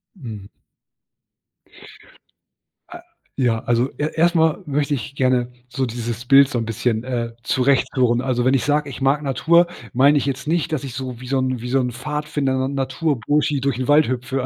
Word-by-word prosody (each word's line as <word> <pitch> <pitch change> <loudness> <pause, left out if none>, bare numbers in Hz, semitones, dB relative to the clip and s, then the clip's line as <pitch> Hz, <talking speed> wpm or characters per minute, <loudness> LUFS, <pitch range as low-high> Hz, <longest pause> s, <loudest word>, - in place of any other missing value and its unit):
Mhm. 110 - -9 2.4
Äh, 345 - -9 0.4
ja, 120 -4 +1
also, 120 +2 +1
e 150 - 0
erstmal 160 -1 +2
möchte 145 0 -1
ich 140 0 -5
gerne 125 -2 +1 0.2
so 130 +1 -1
dieses 120 0 -5
Bild 135 +1 +6
so 130 - -2
'n 115 - -3
bisschen, 115 0 -1
äh, 120 -2 -3
zurecht 130 +1 +2
führen. 120 -3 +2
Also, 125 -2 -1
wenn 130 - +3
ich 135 - +2
sage: 150 0 +1
„Ich 135 - -9
mag 135 +2 +2
Natur." 160 +5 +3 0.3
Meine 140 +4 +5
ich 140 - 0
jetzt 135 0 -3
nicht, 165 0 0
dass 150 - -2
ich 135 -3 -6
so, 130 -2 -6
wie 125 - -10
so 135 +1 0
'n 130 -2 -1
wie 125 - -5
so 135 +2 +2
'n 125 -1 -1
Pfadfinder, 150 +1 -2
'n 135 - -3
"Naturburschi", 145 +1 0
durch 135 -3 -1
'n 130 - -2
Wald 145 +1 +5
hüpfe. 130 +1 -2
130 Hz, 185 wpm, -21 LUFS, 125-145 Hz, 2.4 s, Bild